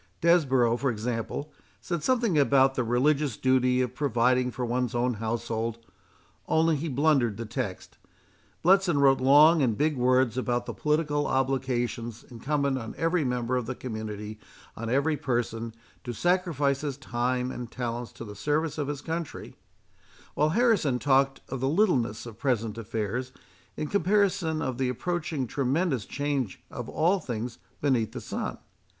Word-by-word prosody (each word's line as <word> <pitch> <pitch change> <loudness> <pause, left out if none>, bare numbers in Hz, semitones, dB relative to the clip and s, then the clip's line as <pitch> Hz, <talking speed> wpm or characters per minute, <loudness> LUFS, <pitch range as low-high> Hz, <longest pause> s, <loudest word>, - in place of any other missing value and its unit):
Desborough, 135 -9 +3
for 135 +2 0
example, 115 +5 -3 0.3
said 175 -3 -3
something 235 -3 +1
about 135 -2 +4
the 130 - 0
religious 135 +2 +1
duty 130 -1 +3
of 125 -1 -2
providing 125 -2 +2
for 125 0 -3
one's 120 0 -1
own 125 +1 +1
household, 115 +1 -3 0.7
only 160 0 +3
he 150 +3 -3
blundered 135 -6 +2
the 115 - -4
text. 105 -4 -5 0.7
Bletson 185 -3 +4
wrote 135 -1 +4
long 150 +5 +6
and 115 -6 +1
big 150 0 +1
words 130 -1 +2
about 120 -1 -1
the - - -5
political 150 -1 0
obligation 130 -3 -1 0.2
incumbent 140 +2 -1
on 115 -2 -7
every 165 0 +1
member 125 -1 -1
of 125 -3 -1
the 130 - -3
community, 110 -3 -6 0.4
on 115 0 -5
every 140 +5 +2
person, 115 -3 -2 0.3
to 120 - -4
sacrifice 160 -4 +1
his 145 -3 -3
time 125 -1 -1
and 120 -2 -6
talents 120 -1 -4
to 120 -1 -9
the 105 - -8
service 150 +7 -1
of 145 - -1
his 145 -2 -4
country; 165 -1 -5 0.8
while 150 +1 +2
Harrison 195 - +2
talked 135 +1 +2
of 135 - -4
the 130 +2 0
littleness 140 - +1
of 115 -3 -10
present 115 -5 0
affairs, 115 +3 -3 0.5
in - - -2
comparison 190 -2 +1
of 130 -1 -3
the 130 -1 +1
approaching 155 +1 -2
tremendous 135 - 0
change 140 -8 -2
of - - -6
all 180 +5 +2
things 120 -4 -5 0.2
beneath 120 -6 +1
the - - -5
sun. - - -4
130 Hz, 155 wpm, -27 LUFS, 120-150 Hz, 0.8 s, long